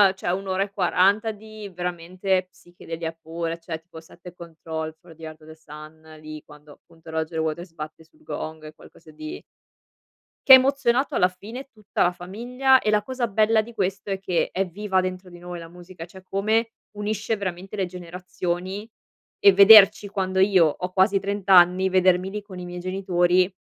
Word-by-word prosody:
cioè 175 -2 -3
1 195 +2 -4
ora 190 +1 0
e 200 - -8
40 200 +3 +2
di, 215 0 -11
veramente, 180 +1 -2
psichedelia 165 -2 -8
pura, 165 +1 -4
cioè 165 -1 -7
tipo 160 -1 -13
Set 170 +1 -19
the 180 - -11
Controls 160 -2 -7
for 175 -2 -16
the 165 - -16
Heart 155 0 -9
of 155 - -17
the 160 - -11
Sun, 155 0 -13
lì 155 0 -9
quando 150 0 -17
appunto 165 -1 -19
Roger 160 0 -3
Waters 160 +2 -4
batte 155 0 -9
sul 310 - -27
gong, 155 - -7
è 155 - -10
qualcosa 160 0 -18
di 155 0 -9 1.0
che 265 - +10
ha - - +15
emozionato 265 0 +1
alla 180 - +4
fine 225 +9 -10
tutta 215 -2 -2
la 175 - +2
famiglia, 245 +9 +1
e 215 - -2
la 210 -1 +2
cosa 255 0 -3
bella 220 +1 +2
di 235 +2 -12
questo 195 0 -3
è 195 - -2
che 185 -3 -1
è 195 +1 -1
viva 190 +1 -1
dentro 185 0 -5
di 175 - -13
noi 175 0 -8
la 165 - -10
musica, 175 0 -11
cioè 185 +2 -15
come 220 +4 0 0.3
unisce 215 +2 -2
veramente 190 0 -6
le 195 -2 -1
generazioni 180 +3 -6 0.5
e 200 - +7
vederci 200 +1 +8
quando 190 -1 -2
io 190 -3 +5
ho 180 +4 -4
quasi 195 +1 +3
30 200 0 -5
anni, 185 +1 +6
vedermi 185 0 +2
lì 210 +1 -5
con 190 -3 -11
i 180 - -7
miei 175 0 -7
genitori 185 0 +1
185 Hz, 190 wpm, -23 LUFS, 170-200 Hz, 1.0 s, ha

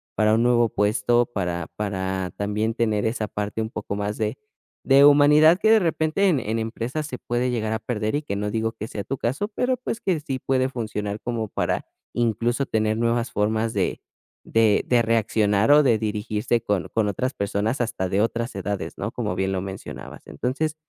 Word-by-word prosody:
para 110 0 +3
un 115 - +2
nuevo 120 -1 +4
puesto, 105 +4 +2
para 90 -7 -3
para 95 -3 -2
también 105 +2 -1
tener 110 -3 0
esa 110 -1 -1
parte 105 +1 -3
un 110 - -3
poco 105 -2 -5
más 105 +1 -3
de 110 +3 -2 0.5
de 140 +1 +6
humanidad, 150 +4 +6
que 220 - +4
de 225 - +7
repente 165 +1 +1
en 165 -8 +3
en 115 -1 -2
empresas 120 +7 -3
se 130 - -6
puede 120 +1 -1
llegar 110 -2 -1
a 110 - -1
perder. 110 0 -2
Y 150 - 0
que 100 - -4
no 105 +1 -2
digo 115 0 -1
que 110 0 -6
sea 100 - -5
tu 135 - -3
caso, 130 - -1
pero, 250 +4 -1
pues, 235 -2 -5
que 185 -8 0
sí 135 -3 -4
puede 130 0 +1
funcionar 105 -4 -4
como 115 -3 -3
para - - -2 0.3
incluso 120 +3 0
tener 110 -2 0
nuevas 115 +1 0
formas 110 +2 0
de - - -1 0.4
de 110 -2 +3
de 120 -1 +4
reaccionar, 110 0 +2
o 150 +1 +8
de 120 -5 +4
dirigirse 105 +1 -1
con 105 -6 -1
con 110 -2 +1
otras 130 +7 -2
personas 105 +4 -1
hasta 110 -6 -2
de 100 +2 +1
otras 115 +1 -1
edades, 100 -2 -4
¿no?, - - -3
como - - -3
bien 95 0 -1
lo 95 - -1
mencionabas. 95 0 -8
Entonces, 140 - -2
115 Hz, 195 wpm, -24 LUFS, 105-125 Hz, 0.5 s, o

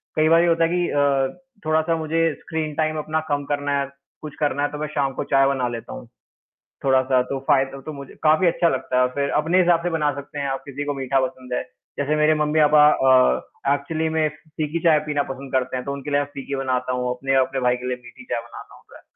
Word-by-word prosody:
कई 155 0 +3
बार 165 +1 +6
ये 175 - +2
होता 165 0 +3
है 165 - +2
कि 175 0 0
अ, 140 -2 +1 0.3
थोड़ा-सा 160 +1 +2
मुझे 160 0 0
स्क्रीन 155 -1 -4
टाइम 155 0 0
अपना 155 +1 -1
कम 145 0 0
करना 145 0 -1
है, 140 -1 -2 0.3
कुछ 155 -1 -8
करना 145 -1 0
है, 145 - +1
तो 150 - -6
मैं 155 +1 -3
शाम 135 -2 0
को - - -3
चाय 135 0 +5
बना 135 -2 0
लेता 115 -1 -7
हूँ। - - -9 0.8
थोड़ा-सा 130 -1 +3
तो 135 - -2
फाय 140 -3 +5 0.2
तो 155 - -5
मुझे 140 -2 -10
काफ़ी 155 +4 +4
अच्छा 170 0 +2
लगता 130 -2 -2
है - - +5
और 125 - +1
फिर 140 0 0
अपने 165 +4 +2
हिसाब 175 -2 +3
से 175 - 0
बना 155 -3 +1
सकते 145 +1 -7
हैं, 140 - -2
आप 135 0 -2
किसी 140 0 -5
को 145 - -1
मीठा 135 -1 0
पसंद 130 -1 -8
है। - - 0 0.4
जैसे 145 +2 +1
मेरे 150 +1 +4
मम्मी-पापा 150 0 +5
अ, 130 - +2
एक्चुअली 155 +3 -2
में 160 -1 +1
फी 155 +1 -20 0.2
फीकी 155 +3 -3
चाय 160 -3 +5
पीना 145 -1 0
पसंद 135 0 -10
करते 130 0 0
हैं, 125 - -6
तो 140 - -3
उनके 140 +1 -6
लिए 145 - +3
मैं 145 - -1
फीकी 140 0 -5
बनाता 130 -1 -1
हूँ, 125 0 -1
अपने 135 +2 -1
और 130 - +4
अपने 135 0 -3
भाई 125 - +3
के 125 +1 -6
लिए 125 -1 -2
मीठी 120 - -13
चाय 120 - -2
बनाना 120 - -12
होता - - -17
है। - - -19
145 Hz, 250 wpm, -22 LUFS, 135-155 Hz, 0.8 s, बार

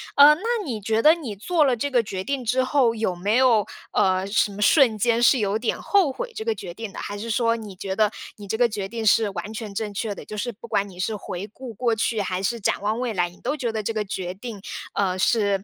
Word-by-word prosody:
呃， 290 +1 +9
那 320 - -6 0.2
你 230 -7 -4
觉 220 +2 0
得 310 - +8
你 275 -12 -5
做 320 - +1
了 260 -4 +2
这 285 +5 -2
个 245 - +4
决 190 -4 -5
定 275 0 -2
之 255 +3 +1
后， 255 -3 +2
有 215 -5 -1
没 200 +6 0
有， 245 -5 +4 0.2
呃， 185 0 +2
什 205 +1 +1
么 200 - -9
瞬 225 0 +5
间 235 +2 +2
是 255 +2 +6
有 210 0 0
点 230 - -1
后 380 -9 +2
悔 - - -5
这 440 - -4
个 450 -1 0
决 175 - -8
定 220 0 -7
的？ - - -11
还 205 - -5
是 230 +2 -5
说 230 +1 +2
你 215 -4 -8
觉 190 0 -4
得 215 -1 +3 0.3
你 205 -1 -10
这 220 - -2
个 240 -1 +4
决 205 -3 -4
定 225 0 -4
是 215 0 +4
完 195 +3 -6
全 215 -3 -6
正 210 -1 -3
确 205 0 -3
的， - - -10
就 215 - -7
是 240 +4 -2
不 235 +2 -12
管 200 -2 0
你 180 - -14
是 215 +4 -1
回 190 -1 -6
顾 255 -2 -8
过 235 +1 +1
去 225 0 0
还 185 -1 -2
是 235 +4 -1
展 200 - 0
望 215 +3 -1
未 245 -3 -2
来， 175 -3 0
你 175 - -18
都 295 - -2
觉 245 -5 -2
得 215 -1 -3
这 225 - -2
个 215 - -1
决 185 -3 -4
定， 210 +1 -8 0.4
呃， 185 -2 0
是 200 -3 +2
220 Hz, 290 characters per minute, -24 LUFS, 200-245 Hz, 0.4 s, 呃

